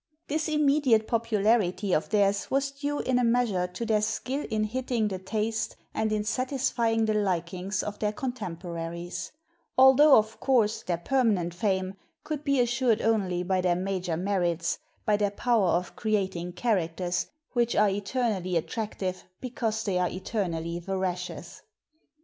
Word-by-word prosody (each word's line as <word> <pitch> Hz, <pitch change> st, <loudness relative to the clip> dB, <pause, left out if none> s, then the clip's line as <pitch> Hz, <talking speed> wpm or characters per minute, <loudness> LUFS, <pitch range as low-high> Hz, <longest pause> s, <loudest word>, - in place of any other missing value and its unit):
This 310 Hz, +1 st, 0 dB
immediate 285 Hz, -7 st, +3 dB
popularity 215 Hz, -4 st, +1 dB
of 155 Hz, -, +1 dB
theirs 200 Hz, -1 st, +2 dB
was 275 Hz, +1 st, +1 dB
due 285 Hz, +1 st, -3 dB
in 255 Hz, -1 st, +1 dB
a -, -, +2 dB
measure 230 Hz, -6 st, +2 dB
to 180 Hz, +6 st, -5 dB
their 215 Hz, -2 st, +2 dB
skill 255 Hz, +6 st, -2 dB
in 215 Hz, -1 st, 0 dB
hitting 240 Hz, 0 st, -1 dB
the 190 Hz, -2 st, -4 dB
taste 220 Hz, +3 st, -2 dB, 0.2 s
and 220 Hz, 0 st, 0 dB
in 210 Hz, -1 st, 0 dB
satisfying 240 Hz, -2 st, 0 dB
the 215 Hz, -, +1 dB
likings 185 Hz, -1 st, -1 dB
of 210 Hz, 0 st, -5 dB
their 210 Hz, -1 st, 0 dB
contempo 200 Hz, -8 st, -5 dB
raries, 170 Hz, +2 st, -5 dB, 0.5 s
altho 265 Hz, +3 st, +8 dB
of 220 Hz, 0 st, 0 dB
course, 230 Hz, -6 st, +2 dB
their 175 Hz, -2 st, -1 dB
permanent 200 Hz, -4 st, +1 dB
fame 190 Hz, 0 st, -1 dB, 0.3 s
could 300 Hz, -2 st, -4 dB
be 280 Hz, -2 st, +2 dB
assured 240 Hz, -2 st, +2 dB
only 190 Hz, -6 st, +1 dB
by 185 Hz, 0 st, +1 dB
their 180 Hz, -1 st, +2 dB
major 185 Hz, -2 st, -2 dB
merits, 175 Hz, -3 st, 0 dB, 0.3 s
by 210 Hz, -1 st, +3 dB
their 205 Hz, -1 st, +1 dB
power 220 Hz, -1 st, +1 dB
of 175 Hz, +1 st, 0 dB
creating 190 Hz, -5 st, -1 dB
characters, 180 Hz, -3 st, -1 dB, 0.3 s
which 240 Hz, -1 st, +1 dB
are 210 Hz, 0 st, +4 dB
eternally 200 Hz, -3 st, -1 dB
attractive 190 Hz, 0 st, -3 dB
because 230 Hz, -3 st, -2 dB
they 190 Hz, -4 st, 0 dB
are 180 Hz, -1 st, +1 dB
eternally 175 Hz, -3 st, -3 dB
veracious. 180 Hz, 0 st, -4 dB
210 Hz, 150 wpm, -27 LUFS, 180-235 Hz, 0.5 s, altho